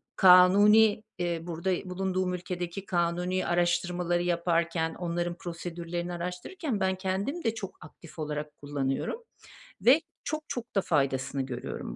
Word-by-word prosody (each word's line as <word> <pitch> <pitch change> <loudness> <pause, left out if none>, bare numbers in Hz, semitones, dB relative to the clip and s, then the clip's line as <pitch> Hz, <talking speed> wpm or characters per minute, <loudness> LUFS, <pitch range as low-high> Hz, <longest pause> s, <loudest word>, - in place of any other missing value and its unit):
kanuni 205 +4 +7 0.2
eee, 175 -1 -1
burada 175 +2 -2
bulunduğum 185 0 -1
ülkedeki 180 +1 -4
kanuni 175 -1 0 0.2
araştırmaları, - - 0
araştırmaları 175 0 0
yaparken, 170 -1 0
onların 175 0 -2
prosedürlerini 175 0 -5
araştırırken 190 - -4
ben 190 -1 +1
kendim 195 - -2
de 225 - +1
çok 195 -4 -7
aktif 160 +1 -14
olarak 150 -1 -4
kullanıyorum 145 - -2 0.6
ve 270 +7 +6 0.2
çok 310 +1 -3
çok 240 -2 -6
da 195 - +4
faydasını 135 -2 0
görüyorum 125 - -6
175 Hz, 125 wpm, -29 LUFS, 170-190 Hz, 0.6 s, kanuni